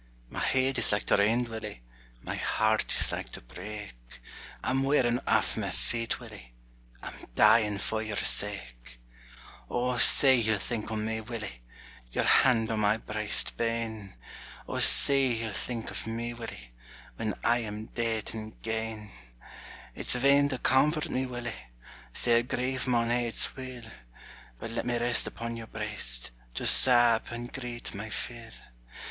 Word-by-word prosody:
My - - -5
heid 130 0 +1
is - - +10
like 105 0 0
to - - +2
rend, 115 +4 +2
Willie, 110 - -8 0.4
My - - -5
heart 110 0 0
is - - +3
like - - -5
to - - -8
break; 105 - -9 0.7
I'm 135 +1 0
wearin' 130 -3 +1
aff - - +1
my - - -2
feet, 115 -1 -3
Willie, - - -13 0.5
I'm - - -7 0.2
dyin' 105 -1 +4
for 110 +2 -2
your 110 -2 -5
sake! - - -3 0.7
O, 125 0 -1
say 130 +2 +7
ye'll 110 -2 +1
think 110 +2 -5
on 110 -1 -3
me, 110 0 -3
Willie, 110 - -8 0.5
Your - - 0
hand 115 -4 +3
on 110 - -1
my 105 +1 +2
briest 105 -1 +1
bane, 115 -4 -3 0.5
O, - - -4
say 135 -1 +6
ye'll 115 -2 -4
think 115 +2 -5
of - - -6
me, 115 +1 -4
Willie, 90 - -10 0.5
When 110 -2 -3
I 120 +1 +2
am 110 -1 -6
deid 115 -2 -3
and 110 -1 -9
gane! 110 -2 -4 0.8
It's - - +1
vain 140 +3 +3
to 130 - -3
comfort 150 +5 +1
me, 130 0 -1
Willie, 120 - -7 0.4
Sair 120 - +3
grief 130 +2 -3
maun 120 -2 +1
ha'e 120 0 0
its 115 - +1
will; 130 -2 -9 0.7
But 115 - -7
let 115 - -3
me 120 -1 0
rest 120 0 +1
upon 115 0 -6
your 115 -1 -9
briest 105 - -3 0.2
To - - -3
sab 120 -3 +6
and 120 +1 -7
greet 120 -3 -6
my 110 +2 -7
fill. 115 +2 -6
115 Hz, 155 wpm, -28 LUFS, 105-120 Hz, 0.8 s, is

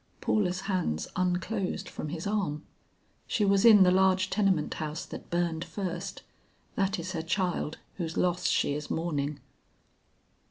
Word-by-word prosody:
Paula's 190 -3 +1
hands 185 - -1
unclosed 185 +2 -1
from 155 - -6
his 165 +1 -5
arm. 190 -8 -1 0.6
"She 210 - +1
was 195 0 +3
in 215 -4 +9
the 180 - +5
large 185 0 +3
tenement 190 -7 +2
house 155 0 -4
that - - -9
burned 170 -1 0
first; 185 -1 -5 0.5
that 195 -1 0
is 180 +2 -4
her 165 -4 -2
child 175 -2 -1 0.2
whose 165 -3 -3
loss 180 0 +1
she - - +2
is 150 +1 -5
mourning." 150 -3 -2
180 Hz, 145 wpm, -29 LUFS, 160-195 Hz, 0.6 s, in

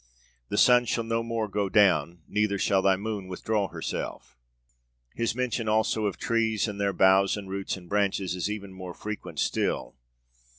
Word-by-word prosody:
The 105 - -2
sun 125 +1 +6
shall 115 +1 -1
no 115 0 -1
more 115 -1 -2
go 100 -1 -1
down, 85 -5 +3
neither 105 -1 0
shall 95 0 +2
thy 95 0 +4
moon 100 -1 -4
withdraw 100 +2 -1
herself.' - - -5 0.8
His 115 -1 -1
mention 125 -3 -1
also 110 0 +1
of 100 - -3
trees 110 -2 +1
and 100 -1 -5
their 100 0 +2
boughs 95 +1 +4
and 100 -2 -7
roots 95 0 -3
and 90 -2 -13
branches 100 -2 0
is 90 +2 -2
even 100 -2 -6
more 95 -2 -8
frequent 105 0 -7
still. - - -1
100 Hz, 170 wpm, -27 LUFS, 95-110 Hz, 0.8 s, sun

